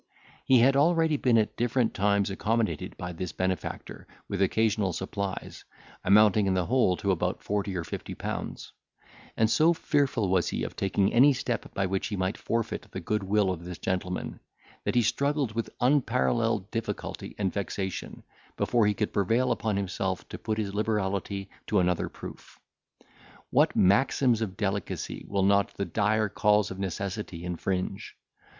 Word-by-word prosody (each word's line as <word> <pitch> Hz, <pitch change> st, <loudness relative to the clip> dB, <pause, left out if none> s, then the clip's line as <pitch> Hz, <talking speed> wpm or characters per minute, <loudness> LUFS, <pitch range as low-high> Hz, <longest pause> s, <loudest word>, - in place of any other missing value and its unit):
He 130 Hz, -, +6 dB
had 135 Hz, +3 st, +5 dB
already 160 Hz, +1 st, +3 dB
been 125 Hz, -4 st, +3 dB
at 110 Hz, -1 st, +1 dB
different 120 Hz, 0 st, +1 dB
times 100 Hz, 0 st, +1 dB
accommodated 110 Hz, -4 st, -1 dB
by 90 Hz, 0 st, -5 dB
this 90 Hz, +1 st, -4 dB
benefactor 95 Hz, 0 st, -4 dB, 0.2 s
with 100 Hz, -1 st, -3 dB
occasional 105 Hz, -1 st, +2 dB
supplies, 95 Hz, +2 st, -4 dB, 0.4 s
amounting 105 Hz, 0 st, +5 dB
in 95 Hz, -, +2 dB
the 90 Hz, -1 st, +1 dB
whole 115 Hz, -7 st, +2 dB
to 100 Hz, -, 0 dB
about 90 Hz, -, -1 dB
forty 100 Hz, -1 st, -2 dB
or 85 Hz, -, -2 dB
fifty -, -, -6 dB
pounds; -, -, -5 dB, 0.7 s
and 110 Hz, -, +4 dB
so 155 Hz, +9 st, +4 dB
fearful 140 Hz, -, +1 dB
was 90 Hz, -3 st, +2 dB
he -, -, -2 dB
of -, -, -5 dB
taking 95 Hz, 0 st, +1 dB
any 140 Hz, +4 st, +6 dB
step 120 Hz, -3 st, -3 dB
by 95 Hz, -, +1 dB
which 95 Hz, +1 st, -1 dB
he 105 Hz, -, -3 dB
might 95 Hz, +1 st, -1 dB
forfeit 115 Hz, -1 st, -2 dB
the -, -, -6 dB
goodwill 105 Hz, -1 st, +1 dB
of 85 Hz, -2 st, -5 dB
this 90 Hz, -1 st, -7 dB
gentleman, 90 Hz, -1 st, -3 dB, 0.5 s
that -, -, 0 dB
he 120 Hz, -, +4 dB
struggled 140 Hz, +2 st, 0 dB
with 115 Hz, 0 st, -2 dB
unparelleled 120 Hz, -, +1 dB
difficulty -, -, -4 dB
and 95 Hz, -3 st, -1 dB
vexation, 95 Hz, -1 st, -4 dB, 0.3 s
before 115 Hz, -4 st, +2 dB
he 105 Hz, -, +1 dB
could 105 Hz, +1 st, -2 dB
prevail 115 Hz, +6 st, +2 dB
upon 110 Hz, -3 st, 0 dB
himself 95 Hz, -1 st, -2 dB
to -, -, -7 dB
put 110 Hz, -1 st, -2 dB
his 100 Hz, -3 st, -2 dB
liberality 100 Hz, -2 st, -1 dB, 0.2 s
to -, -, +1 dB
another 90 Hz, -1 st, +1 dB
proof. -, -, -11 dB, 0.9 s
What -, -, +3 dB
maxims 115 Hz, +4 st, +3 dB
of 100 Hz, -4 st, -3 dB
delicacy 100 Hz, -2 st, -3 dB
will 100 Hz, -1 st, 0 dB
not 100 Hz, 0 st, +3 dB
the 100 Hz, -, -2 dB
dire 110 Hz, +1 st, +1 dB
calls 105 Hz, 0 st, +2 dB
of 95 Hz, -, -7 dB
necessity 95 Hz, -1 st, -4 dB
infringe! 90 Hz, +2 st, -3 dB
100 Hz, 160 wpm, -28 LUFS, 95-115 Hz, 0.9 s, He